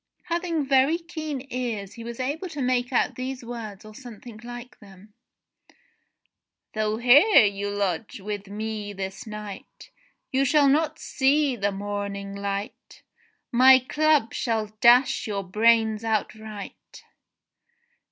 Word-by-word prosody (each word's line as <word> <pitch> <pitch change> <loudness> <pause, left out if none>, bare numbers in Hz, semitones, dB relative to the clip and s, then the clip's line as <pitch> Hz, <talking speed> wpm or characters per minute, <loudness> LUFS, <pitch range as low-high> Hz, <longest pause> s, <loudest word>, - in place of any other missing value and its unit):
Having 340 -3 -1
very 270 +4 +3
keen 310 -5 -6
ears 225 -6 -3
he 230 - -10
was 235 +1 -7
able 295 +8 -3
to 295 - -7
make 250 0 0
out 250 - +1
these 255 0 -5
words 220 -4 -8
or 215 - -12
something 235 -2 -11
like 240 +1 -9
them: 200 0 -17 1.6
"Though 215 0 -1
here 260 - +6
you 200 0 -2
lodge 205 0 -2
with 205 0 -6
me 210 0 -5
this 195 +3 -6
night, 210 -2 -9 0.4
You 265 +1 +2
shall 285 +1 +4
not 310 +2 +1
see 280 0 +1
the 200 -2 -1
morning 200 0 -5
light. 200 +1 -6 0.5
My 260 +2 +7
club 295 -1 +1
shall 220 -3 -2
dash 245 +1 +5
your 200 -2 -3
brains 220 +2 +2
outright.' 215 -2 -5
230 Hz, 125 wpm, -25 LUFS, 205-265 Hz, 1.6 s, My